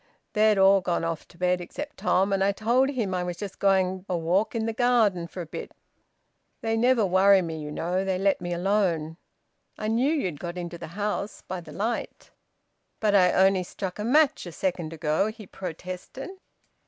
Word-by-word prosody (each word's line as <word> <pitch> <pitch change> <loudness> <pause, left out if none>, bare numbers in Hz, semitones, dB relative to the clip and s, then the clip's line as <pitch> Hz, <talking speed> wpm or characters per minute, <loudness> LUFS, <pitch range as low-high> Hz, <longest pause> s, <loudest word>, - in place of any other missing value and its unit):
They'd 215 -1 +4
all 195 0 +6
gone 175 -2 -1
off 165 -1 -3
to 170 - -19
bed 180 0 +1
except 290 +12 -7
Tom, 195 +2 +2
and 195 0 +2
I 200 +1 +2
told 240 +6 +2
him 230 -9 -2
I 180 -1 -1
was 175 -1 -4
just 200 +1 -7
going 190 -1 +2
a 180 - 0
walk 180 +8 0
in 225 -1 0
the 225 - -1
garden 220 -8 +2
for 180 - -7
a - - -5
bit. 160 - -8 0.9
They 225 0 0
never 235 -1 +3
worry 190 +1 +5
me, 160 -2 -5
you 150 - -6
know. 180 +5 -1
They 190 -1 0
let 195 0 +1
me 175 0 -4
alone. 175 -4 0 0.6
I 215 - -2
knew 245 +6 +2
you'd 185 - -1
got 175 0 -5
into 170 -1 -6
the - - -7
house, 210 0 -3
by 185 -1 -5
the - - -12
light." 225 +4 -4 0.7
"But 210 -2 +2
I 185 -3 +5
only 190 0 +4
struck 185 +1 -6
a - - -2
match 275 - +3
a - - -6
second 175 -2 -2
ago," 155 +4 0
he 220 -1 -8
protested. 185 - -7
190 Hz, 195 wpm, -26 LUFS, 175-215 Hz, 0.9 s, all